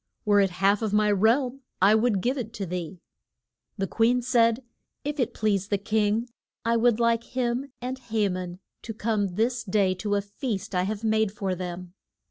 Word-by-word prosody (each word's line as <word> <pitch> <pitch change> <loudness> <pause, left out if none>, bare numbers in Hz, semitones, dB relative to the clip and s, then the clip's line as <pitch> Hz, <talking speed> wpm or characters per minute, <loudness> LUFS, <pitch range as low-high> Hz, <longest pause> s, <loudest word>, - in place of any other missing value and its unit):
Were 205 -1 +4
it 195 -1 +4
half 195 +3 +2
of 215 -2 -1
my 210 0 +3
realm 245 +6 +2 0.2
I 195 +3 +6
would 220 -3 +2
give 250 +6 0
it 230 -4 -5
to 200 - -4
thee. 180 0 -5 0.8
The 195 - 0
queen 235 +5 +2
said, 235 0 +3 0.4
If 295 +1 -3
it 245 -2 +1
please 200 -3 0
the 205 - +1
king, 215 +3 0 0.4
I 230 0 +2
would 235 0 +3
like 235 0 +2
him 250 +2 -1
and 260 +1 -3
Ha 220 -4 0
man 180 -1 -4 0.2
to 225 - -7
come 205 -4 -1
this 235 +3 0
day 195 -2 +2
to 205 +2 -2
a 200 - +1
feast 205 -1 -4
I 180 0 +1
have 215 +2 -4
made 220 -2 +2
for 195 -2 -2
them. 180 0 -6
215 Hz, 190 wpm, -26 LUFS, 195-235 Hz, 0.8 s, I